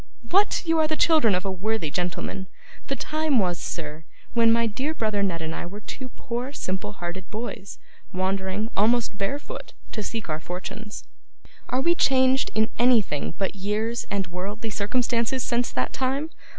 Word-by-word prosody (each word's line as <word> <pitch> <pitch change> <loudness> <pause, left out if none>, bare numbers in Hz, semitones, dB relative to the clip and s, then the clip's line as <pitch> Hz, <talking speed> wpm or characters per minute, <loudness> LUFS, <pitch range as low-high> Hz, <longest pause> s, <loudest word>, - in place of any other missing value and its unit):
What! 400 +2 +4
You 325 -1 +3
are 310 - +4
the 310 0 0
children 305 - +5
of 185 +2 -1
a 195 - 0
worthy 190 -3 -1
gentleman! 180 +2 -2 0.4
The 275 - 0
time 310 -1 +1
was, 180 -5 +2
sir, 155 -1 -5 0.3
when 230 -1 +6
my 230 0 +4
dear 265 +8 -1
brother 215 -6 +1
Ned 170 -5 0
and 160 0 -3
I 175 - -4
were 200 +4 -7
two 255 +4 -6
poor 245 +3 -4
simple 190 -3 -3
hearted 175 0 -6
boys, 215 -2 -5 0.3
wandering, 190 +3 -1
almost 225 +1 +3
barefoot, 285 - -3 0.2
to 215 - -3
seek 220 +1 -4
our 155 -1 -2
fortunes: 195 +5 -6 0.7
are 255 - +2
we 340 +5 +4
changed 260 -4 +4
in 220 +1 +3
anything 220 - +3
but 195 - 0
years 210 +4 -1
and 200 -1 0
worldly 200 +5 -4
circumstances 235 +4 +1
since 240 -1 +1
that 125 - -1
time? 275 +4 0
215 Hz, 165 wpm, -26 LUFS, 190-255 Hz, 0.7 s, when